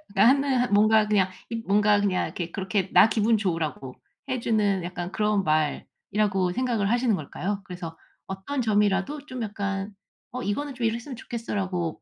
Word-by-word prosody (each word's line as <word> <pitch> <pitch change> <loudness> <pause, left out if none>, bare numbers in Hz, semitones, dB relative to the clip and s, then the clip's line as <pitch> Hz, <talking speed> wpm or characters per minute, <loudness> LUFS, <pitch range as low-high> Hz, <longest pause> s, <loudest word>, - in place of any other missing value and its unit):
하는 255 +1 +4
뭔가 215 +1 +5
그냥 195 -3 +2 0.2
입 230 0 -4
뭔가 205 +1 +3
그냥 190 -3 0 0.2
그렇게 190 0 -1
'나 - - +7
기분 220 0 +2
좋으라고 160 -9 -3 0.3
해 255 -1 -1
주는 205 -5 +1
약간 175 0 -5
그런 210 -2 +1
말'이라고 180 +5 0
생각을 235 -5 0
하시는 240 -3 +2
걸까요? 195 +6 -4
그래서 175 -3 -8 0.3
어떤 195 +9 -3
점이라도 210 +5 +1
좀 255 -2 -6
약간 200 -1 -3 0.4
어 255 +1 -5
"이거는 275 +7 -2
좀 245 -2 -2
이랬으면 235 +4 -2
좋겠어."라고 190 -8 -3
205 Hz, 335 characters per minute, -26 LUFS, 190-230 Hz, 0.4 s, 나